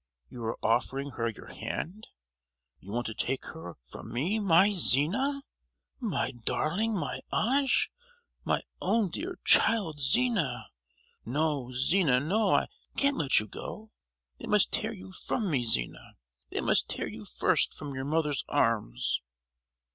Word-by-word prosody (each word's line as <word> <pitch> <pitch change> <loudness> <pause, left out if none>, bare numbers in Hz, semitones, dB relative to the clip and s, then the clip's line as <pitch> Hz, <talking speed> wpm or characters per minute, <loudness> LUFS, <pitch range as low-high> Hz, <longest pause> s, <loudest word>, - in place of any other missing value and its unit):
you 120 - -8
are 115 +1 -2
offering 135 +5 0
her 115 -1 -2
your 110 - -10
hand. 205 +7 -5 0.7
You 100 - -11
want 120 +2 -2
to 110 - -3
take 130 +5 -2
her 125 - -9
from - - -10
me, 165 - 0
my 195 0 +5
Zina! 195 - +4 0.6
my 200 - -1
darling, 170 - -1
my - - -3
ange, 265 +3 +2 0.5
my - - 0 0.2
own 220 -6 +1
dear 360 - -5
child, 190 -10 +4
Zina! 150 - +1 0.5
No, 140 -1 -1
Zina, 135 +1 +3
no, 195 +11 +1
I - - +3 0.3
can't 280 0 +3
let 140 -4 +4
you 105 - -3
go! 215 - -8 0.5
They - - -7
must 210 -2 +3
tear 220 - 0
you 190 -3 -10
from 195 +1 -3
me, 130 -5 +1
Zina. 60 - -2 0.3
They - - -2
must - - +2
tear - - -2
you - - -8
first - - +1
from 145 -2 -7
your 130 0 -4
mother's 150 -1 0
arms!" 85 - 0
155 Hz, 145 wpm, -29 LUFS, -, 0.7 s, my